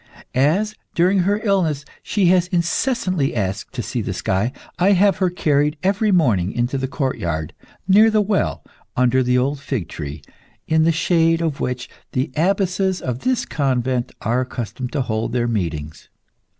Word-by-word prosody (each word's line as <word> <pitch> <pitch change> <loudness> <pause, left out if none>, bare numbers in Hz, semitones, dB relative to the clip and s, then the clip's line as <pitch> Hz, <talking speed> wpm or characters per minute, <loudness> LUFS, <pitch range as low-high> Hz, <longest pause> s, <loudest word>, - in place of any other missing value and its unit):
As, 170 +11 +2 0.2
during 185 +3 +3
her 200 +3 +2
illness, 170 -9 +1 0.2
she 205 -3 0
has 180 -1 +4
incessantly 180 - 0
asked 95 -3 -2
to 120 - -2
see 120 +3 -3
the 95 -3 -4
sky, 95 +6 0 0.3
I 195 +3 +5
have 195 0 +4
her 185 -2 +2
carried 150 -3 +1
every 200 +3 +2
morning 115 - +2
into 120 +3 -1
the 130 - -2
courtyard, 85 - -2 0.3
near 210 +4 +6
the 215 -1 +2
well, 205 -1 0 0.3
under 125 +1 +3
the 125 0 +2
old 135 +3 0
fig 130 - -3
tree, 75 -1 -7 0.4
in 160 0 +3
the 165 - +4
shade 165 0 +2
of 160 -4 -2
which 125 0 -3 0.3
the 130 +5 -1
abbesses 190 +2 +1
of 125 -1 -3
this 255 - 0
convent 130 -3 -1
are 120 +3 +1
accustomed 125 0 -5
to 145 - 0
hold 110 -2 -2
their 120 -1 +1
meetings. 80 -9 -3
140 Hz, 165 wpm, -21 LUFS, 120-185 Hz, 0.4 s, near